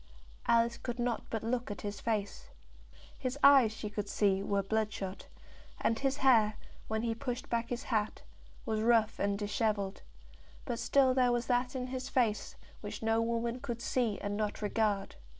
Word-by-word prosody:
Alice 235 0 +3
could 240 -1 -4
not 240 -1 -1
but 225 -1 -3
look 240 +1 -1
at 205 -3 -5
his 205 -1 -5
face. 220 - -2 0.7
His 255 0 -2
eyes 275 -6 +8
she 220 -1 -6
could 205 -1 -4
see 195 -2 +2
were 200 0 0
bloodshot, 205 -2 -2 0.5
and 225 - +1
his 275 0 0
hair, 220 -5 +5 0.3
when 220 0 -1
he 230 -1 0
pushed 245 +2 -5
back 235 0 0
his 245 +1 -3
hat, 215 -3 -1 0.4
was 220 -3 -1
rough 225 -1 +3
and 200 0 +1
dishevelled; 205 -1 -1 0.6
but 240 -3 -3
still 260 +1 +4
there 250 -1 +3
was 240 0 0
that 250 +2 0
in 250 -1 -2
his 255 +1 -5
face 230 -6 0 0.2
which - - -7
no 225 0 +2
woman 235 +1 -1
could 240 -3 -4
see 235 -4 0
and 205 0 -2
not 210 0 -2
regard. 205 -2 0
230 Hz, 170 wpm, -32 LUFS, 210-245 Hz, 0.7 s, eyes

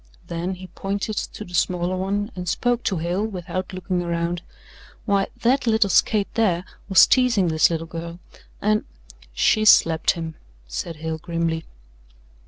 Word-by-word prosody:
Then 175 +3 -3
he 185 +1 -10
pointed 200 +4 -4
to 210 - -5
the 180 - -13
smaller 180 +1 +1
one 200 +4 -2
and 180 -2 -4
spoke 245 +4 0
to 190 - +1
Hale 175 +5 -1
without 185 -3 -4
looking 185 -1 -2
around. 170 0 -2 0.6
"Why, 200 -2 +2 0.2
that 250 +2 +2
little 220 -3 +3
skate 205 +2 +2
there 185 -6 +1 0.2
was 190 - +8
teasing 235 -9 +3
this 155 -1 +4
little 165 -1 -2
girl 170 +1 -7 0.5
and 215 +1 +2 0.3
" - - -25
"She 215 - +4
slapped 165 -6 +5
him," 165 -1 -5 0.3
said - - -4
Hale 160 +1 -4
grimly. 165 0 -2
180 Hz, 155 wpm, -23 LUFS, 170-205 Hz, 0.6 s, was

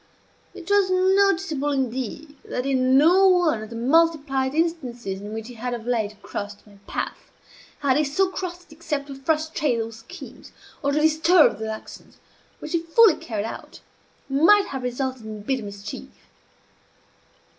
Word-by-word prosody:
It - - -10
was 405 -2 +4
noticeable, 370 -5 +2
indeed, 265 +2 -3
that, 250 - -3
in 260 -1 +3
no 360 +7 +6
one 350 - +3
of 215 - -8
the 230 - -8
multiplied 275 0 +2
instances 250 - -2
in 205 +1 -7
which 220 0 -6
he 250 - -9
had 245 +1 -4
of 230 -1 -9
late 215 -4 -1
crossed 205 0 -6
my 200 -2 -19
path, - - -5 0.5
had 275 -2 +2
he 305 - +3
so 305 +7 +1
crossed 355 -3 -6
it - - -13
except 300 -3 -4
to - - -6
frustrate 305 -2 0
those 225 0 -4
schemes, 225 - -12 0.3
or 280 - 0
to 295 - +1
disturb 315 - +4
those 220 - -4
actions, 220 0 -9 0.4
which, 305 - -8
if 335 0 -1
fully 415 0 +6
carried 215 -3 -4
out, 225 - -8 0.5
might 335 +10 +5
have 265 -1 -4
resulted 250 0 -3
in 215 -1 -8
bitter 260 +3 -1
mischief. 200 - -8
275 Hz, 160 wpm, -24 LUFS, 230-330 Hz, 0.5 s, no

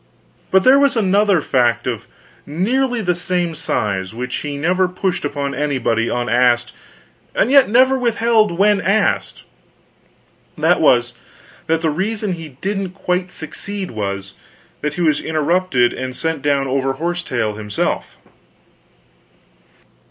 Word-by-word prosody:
But 190 0 +4
there 265 +2 +6
was 280 -3 +2
another 200 -3 +3
fact 120 -3 +1
of 120 -4 -4 0.4
nearly 235 - 0
the 180 -1 +1
same 175 -1 -2
size, 105 -10 -2
which 125 +1 -4
he 145 -1 -5
never 180 +5 +1
pushed 180 0 -2
upon 140 -1 -3
anybody 125 -6 0
unasked, 120 0 +1 0.6
and 235 - +2
yet 275 -5 +6
never 260 +4 +4
withheld 225 -5 +2
when 205 +1 +3
asked: 205 +3 0 1.1
that - - +2
was, - - +3 0.5
that 165 0 +1
the 160 -2 +1
reason 205 +4 -2
he 165 -2 -7
didn't 195 -2 -3
quite 180 -1 -2
succeed 190 +5 -5
was, 100 -3 -4 0.5
that 150 0 -2
he 175 - -3
was 155 -3 +2
interrupted 160 -5 +1
and 130 -1 -5
sent 160 -1 -2
down 140 -1 +1
over 135 0 0
horse 175 +5 -2
tail 120 -9 -2
himself. 105 -1 -3
165 Hz, 130 wpm, -18 LUFS, 130-195 Hz, 1.1 s, there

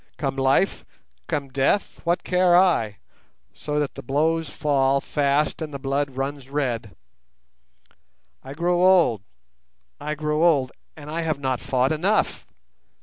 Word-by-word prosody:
Come 135 -2 -2
life, 135 +8 +1 0.4
come 145 -4 -2
death, 135 +9 0
what 170 +1 0
care 180 -1 +3
I, 140 - +2 0.6
so 150 0 -3
that 145 -2 -2
the 135 - -8
blows 155 +5 0
fall 140 -2 +1
fast 145 +2 0
and 155 -1 -4
the 140 - -5
blood 135 0 -2
runs 135 0 -4
red? 120 - -2 1.5
I 135 +2 -9
grow 175 +2 +1
old, 180 - +4 0.8
I 150 +1 -3
grow 150 +1 -1
old, 145 -7 +3 0.3
and 150 0 -9
I 165 +2 -2
have 160 -3 -1
not 130 -3 -1
fought 130 +1 0
enough! 185 +8 0
145 Hz, 140 wpm, -23 LUFS, 135-165 Hz, 1.5 s, old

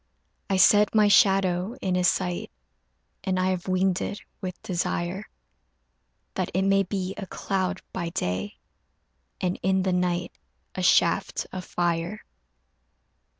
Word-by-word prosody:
I 195 - +2
set 205 +3 +5
my 210 -1 +6
shadow 195 0 +3
in 185 - -1
his 180 0 +3
sight 180 -2 -1 0.7
And 185 -1 0
I 185 0 +2
have 185 0 -3
winged 185 0 +1
it 205 - -3 0.2
with 185 -2 -5
desire, 175 +1 -2 1.1
That - - -2
it 190 - +2
may 195 0 +4
be 190 -1 -3
a 195 - -6
cloud 190 +1 -2
by 170 -2 -3
day 95 - -3 0.8
And 180 0 -1
in 190 0 +2
the 185 -1 +1
night 180 -1 0 0.4
a 185 - -4
shaft 170 -2 +2
of 185 -2 -6
fire. 175 +4 -2
185 Hz, 135 wpm, -26 LUFS, 175-195 Hz, 1.1 s, my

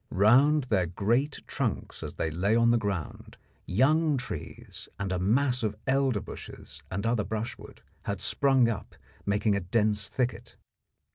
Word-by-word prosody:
Round 135 +10 +4
their 100 -8 +1
great 115 - 0
trunks - - -3
as - - -6
they 80 - -2
lay 95 +7 +1
on 115 0 +4
the 120 - +4
ground, 100 -7 -4 0.3
young 150 - +3
trees 105 - -7
and 100 -2 -2
a 90 - -1
mass 125 +7 +2
of 105 -2 -1
elder 135 -4 +2
bushes - - -10
and 100 +3 -3
other 115 -2 +1
brushwood 110 +2 -6 0.2
had - - -2
sprung 135 -3 +3
up, 115 -3 -4 0.3
making 100 +1 +2
a - - +1
dense 105 +2 0
thicket. 120 -2 -3
115 Hz, 150 wpm, -28 LUFS, 100-130 Hz, 0.3 s, Round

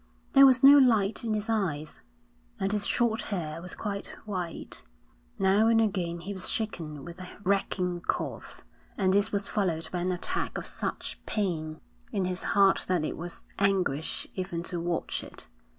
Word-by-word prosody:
There 275 0 +9
was 255 -1 +4
no 285 +1 +10
light 225 -6 +3
in 220 -2 0
his 210 +1 -1
eyes, 175 -9 -1 0.6
and 195 +1 0
his 205 -1 0
short 230 -2 +1
hair 165 -5 -4
was 180 0 -7
quite 200 -2 -4 0.2
white. 180 -5 -5 0.6
Now 195 +3 +4
and 225 0 +5
again 180 -6 0
he 195 +4 -5
was 190 -2 -1
shaken 160 -10 -3
with 175 +1 -9
a 180 - -8
racking 185 -2 0
cough, - - -3 0.3
and 190 -1 +2
this 205 +2 +2
was 200 -1 -1
followed 165 -6 -1
by 180 - -2
an 180 +1 0
attack 365 - -2
of - - -4
such - - -3
pain 160 -7 -2 0.3
in 190 - 0
his 180 0 -2 0.2
heart 195 -1 +5
that 180 -4 +1
it - - -3
was 175 +1 -5
anguish 190 -7 +1
even 185 -3 -3
to 175 -1 -4
watch 170 0 -2
it. - - -9
190 Hz, 170 wpm, -28 LUFS, 175-210 Hz, 0.6 s, no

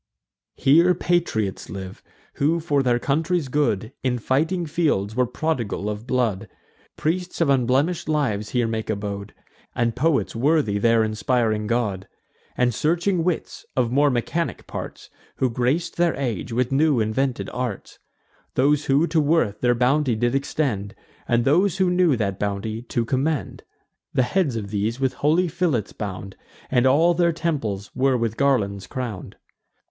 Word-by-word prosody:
Here 170 +6 +4
patriots 165 - -1
live, 95 -1 -7 0.4
who, 160 +4 +2
for 145 -3 +1
their 125 -2 +2
country's 155 +3 0
good, 120 -7 0
In 125 -2 0
fighting 160 +9 0
fields, 145 - 0
were 125 0 +2
prodigal 125 -7 -2
of 105 +3 -7
blood: 115 -6 0 0.5
Priests 175 +4 -2
of 165 -4 +2
unblemish'd 135 +6 +1
lives 110 -9 0
here 120 0 +1
make 110 -1 -3
abode, 100 -1 -4 0.4
And 120 -2 0
poets 145 0 +1
worthy 130 -5 +2
their 115 +1 +4
inspiring 110 -1 0
god; 105 -5 -1 0.5
And 125 -1 +2
searching 170 - +1
wits, 180 -1 -2
of 120 -3 +1
more 145 +3 +4
mechanic 140 +7 -2
parts, - - -8 0.2
Who 130 -2 0
grac'd 130 +9 -1
their 170 -1 +3
age 120 -5 -3
with 125 +2 0
new 145 -1 +3
invented 120 +4 -1
arts: 125 -6 -5 0.6
Those 145 +3 +2
who 140 +4 +3
to 165 -1 +1
worth 145 -9 +1
their 120 0 +3
bounty 130 +1 +2
did 120 +3 0
extend, 135 -7 -1 0.3
And 120 0 +2
those 180 +6 +3
who 185 -2 +2
knew 180 -5 +3
that 100 -3 -2
bounty 105 +2 -3
to 120 -1 -2
commend. 140 +4 -1 0.5
The 130 - +4
heads 155 -2 0
of 100 -3 -5
these 110 +4 -1
with 135 -1 +1
holy 165 +5 +2
fillets 155 - -1
bound, 95 -1 -6 0.4
And 125 0 +3
all 160 +6 +4
their 170 0 +2
temples 140 - -3
were 130 0 +2
with 115 -2 -1
garlands 100 -9 +1
crown'd. 115 -4 -5
130 Hz, 150 wpm, -23 LUFS, 110-155 Hz, 0.6 s, Here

